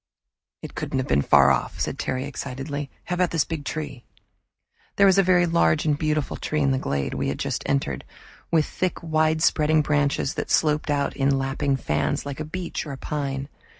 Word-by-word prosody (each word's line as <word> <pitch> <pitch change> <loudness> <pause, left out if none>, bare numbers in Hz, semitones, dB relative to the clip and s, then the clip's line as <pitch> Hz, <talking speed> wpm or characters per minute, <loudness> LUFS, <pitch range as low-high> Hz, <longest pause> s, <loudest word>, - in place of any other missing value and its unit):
"It - - -7
couldn't - - -3
have 130 - -1
been 70 +1 +3
far 70 0 +6
off," 65 - -1
said - - -2
Terry 130 +1 -2
excitedly. 140 +1 -5
"How 180 - -4
about 180 0 +2
this 165 -3 +1
big 160 -3 -4
tree?" 145 -5 -5 0.9
There 200 - +5
was 195 0 +5
a - - +8
very 180 -1 +4
large 165 -2 +2
and 150 -2 +3
beautiful 155 -1 -1
tree 150 0 -2
in 140 -1 +3
the 130 - +1
glade 70 - -2
we - - -2
had - - -2
just - - -2
entered, 135 - -1 0.5
with 160 -3 +3
thick 185 -1 -3
wide 155 0 +1
spreading 155 -1 +3
branches 145 0 +1
that - - -4
sloped 150 -1 +2
out 140 -1 0
in 135 0 +2
lapping 135 +1 0
fans 75 - -1
like 140 -1 -5
a 155 - -3
beech 175 +2 -4
or 140 -2 -5
pine. 135 -1 -3
145 Hz, 195 wpm, -24 LUFS, 135-155 Hz, 0.9 s, a